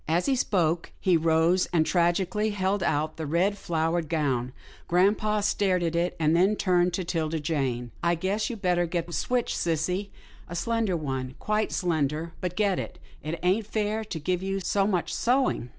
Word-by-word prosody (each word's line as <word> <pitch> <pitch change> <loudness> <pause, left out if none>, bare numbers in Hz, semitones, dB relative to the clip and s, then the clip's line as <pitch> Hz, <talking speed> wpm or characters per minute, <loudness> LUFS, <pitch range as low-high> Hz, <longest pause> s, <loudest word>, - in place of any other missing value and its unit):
As 165 +3 +1
he 275 - +2
spoke, 175 -8 0
he 185 -2 +3
rose, 165 +3 +3
and 160 -2 +3
tragically 180 +5 +1
held 200 -1 0
out 155 -2 0
the 160 -2 -4
red, 180 +7 +2
flowered 165 -3 -1
gown. 135 -6 0 0.4
Grampa 205 +4 +2
stared 190 -3 +1
at 165 0 -1
it, 175 +1 0
then 155 0 +2
he 215 - 0
turned 180 -3 +2
to 185 - -1
'Tilda 165 -2 -1
Jane, 135 -6 -2
" - - -25
I 170 0 +3
guess 195 +8 -1
you'd 230 -5 -7
better 175 -1 +2
get 170 0 -2
the 170 - -10
switch, 245 +5 0
sissy 180 +4 -1 0.2
— - - -23
a 175 - -6
slender 220 0 0
one, 130 -4 -4
quite 215 0 -1
slender, 160 -1 -1
but 180 -1 -3
get 200 -2 +1
it - - -6
— - - -25
it 155 +2 -4
ain't 195 +4 +2
fair 215 0 -1
to 210 -6 -6
give 180 +4 -1
you 195 +1 -2
so 195 +1 +1
much 180 -5 -1
sewing." 250 - +1
175 Hz, 195 wpm, -27 LUFS, 160-200 Hz, 0.4 s, he